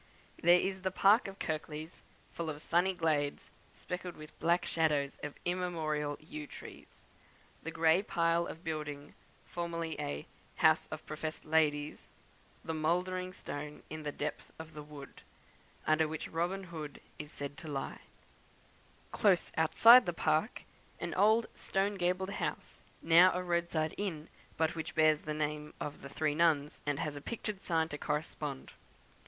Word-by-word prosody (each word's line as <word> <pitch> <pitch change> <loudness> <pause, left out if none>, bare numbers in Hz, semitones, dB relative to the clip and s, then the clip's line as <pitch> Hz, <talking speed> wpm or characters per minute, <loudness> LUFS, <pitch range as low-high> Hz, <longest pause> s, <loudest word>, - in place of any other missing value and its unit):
There 175 +1 +7
is 190 0 -2
the 190 - 0
park 200 +5 +5
of 195 0 -8
Kirklees, 155 0 -4 0.3
full 170 -1 -4
of 150 -1 -4
sunny 180 +3 +2
glades, 150 -4 0 0.2
speckled 180 -1 -5
with 155 0 -12
black 170 +2 +2
shadows 150 -4 +1
of 150 -1 -5
immemorial 160 -5 -1
yew 155 -1 -8
trees; - - -11 0.7
the 165 - -5
grey 165 +2 +4
pile 170 -3 +1
of 165 - -8
building, 150 -3 -4 0.3
formerly 170 -2 -3
a 70 +1 -3 0.3
"House - - +4
of - - -7
professed 155 +1 -5
Ladies;" 150 -2 +1 0.6
the 160 - -2
mouldering 180 +4 0
stone 150 -4 -7
in 155 0 -5
the 150 -1 -3
depth 150 +1 -4
of 160 0 -9
the 150 - -7
wood, 145 -2 -11 0.6
under 155 0 +3
which 155 0 -4
Robin 175 +4 -1
Hood 160 -5 -7 0.2
is 150 0 -7
said 145 0 -6
to 160 - -9
lie; 140 -2 -4 1.1
close 195 -5 +3
outside 225 +8 +8
the 175 - 0
park, 160 +6 0 0.4
an - - -3
old 220 +4 +4
stone 195 +2 0
gabled 185 0 0
house, - - -4 0.2
now 170 +3 +7
a 180 - -1
roadside 170 -3 0
inn, 165 -7 -3 0.3
but 160 0 +2
which 160 -1 -5
bears 155 -1 +5
the 150 0 -4
name 150 0 -3
of 150 - -5
the 140 - -8
"Three 155 +1 0
Nuns," 150 -2 +2
and 145 -1 +1
has 150 0 -2
a 145 - -7
pictured 210 0 -4
sign 160 -2 +1
to 150 - -5
correspond. 150 -2 -3
160 Hz, 155 wpm, -33 LUFS, 150-175 Hz, 1.1 s, outside